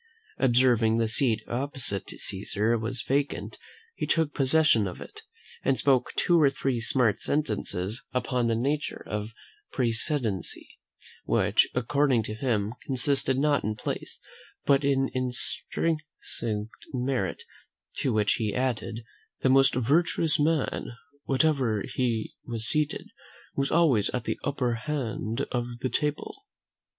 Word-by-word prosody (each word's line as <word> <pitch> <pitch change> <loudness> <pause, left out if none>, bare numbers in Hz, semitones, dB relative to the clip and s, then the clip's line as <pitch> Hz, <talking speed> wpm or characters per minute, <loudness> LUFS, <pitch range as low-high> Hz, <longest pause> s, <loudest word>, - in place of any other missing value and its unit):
Observing 120 -3 +4
the 115 -1 +2
seat 110 -1 +1
opposite 125 -6 -2
to - - -7
Caesar 105 +3 0
was 115 +2 -2
vacant, 140 +1 -1 0.3
he - - -4
took 160 -3 +2
possession 135 -6 +4
of 90 - -7
it, - - -10 0.4
and 135 -1 +1
spoke 135 -3 +2
two 170 -2 +3
or 145 - +6
three 135 -3 -2
smart 115 -2 +2
sentences 105 -7 -1
upon 125 -1 0
the 115 - +1
nature 140 +6 -2
of 105 +1 -3 0.4
precedency, 115 - -1 0.6
which, - - +3
according 130 -1 +2
to 105 - -5
him, 110 -2 -1
consisted 135 0 +2
not 145 +1 +2
in 105 +1 -1
place, - - -5 0.5
but 140 0 +4
in 135 -1 +2
intrinsic 125 -3 -1 0.3
merit: 125 -7 -1 0.5
to 135 - 0
which 105 -2 +2
he 105 -2 -1
added, 120 -3 -2 0.4
"that - - -27
the 130 - +4
most 135 +1 +5
virtuous 155 +5 +2
man, 150 -4 0 0.3
wherever 135 -7 +1
he 115 -4 -1
was 115 -2 -4
seated, 150 +2 0 0.4
was 140 0 0
always 140 -12 +3
at 125 - -3
the - - -3
upper 125 -4 -1
end 115 -6 -2
of 120 -1 -1
the 130 - 0
table." 150 - -2
125 Hz, 130 wpm, -27 LUFS, 115-140 Hz, 0.6 s, or